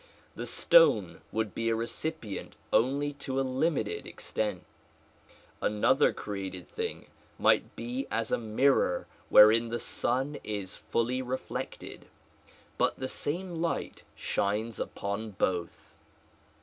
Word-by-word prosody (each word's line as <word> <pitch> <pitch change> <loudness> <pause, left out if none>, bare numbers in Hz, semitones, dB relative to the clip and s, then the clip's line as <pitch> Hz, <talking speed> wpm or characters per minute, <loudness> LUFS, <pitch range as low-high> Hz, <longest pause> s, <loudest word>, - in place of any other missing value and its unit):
The - - -5
stone - - +4
would 110 -3 -1
be 115 0 -1
a 115 - +2
recipient 115 0 -4 0.2
only 140 +4 +2
to 135 -1 -2
a - - +2
limited 130 -3 -1
extent; 105 -5 -3 1.0
another 105 0 +3
created 95 -3 -6
thing - - -4 0.3
might - - +3
be 125 +3 -4
as 115 -1 -1
a - - +2
mirror 120 +5 +2 0.2
wherein 115 +2 +7
the 120 - -1
sun 130 +5 -1
is 100 -3 -4
fully 125 +2 -1
reflected; 130 +1 -5 0.7
but - - +2
the 130 - -3
same 175 +7 -3
light 165 0 -2
shines 105 +3 -1
upon 100 +2 -3
both. 90 -2 -2
115 Hz, 115 wpm, -30 LUFS, 105-135 Hz, 1.0 s, wherein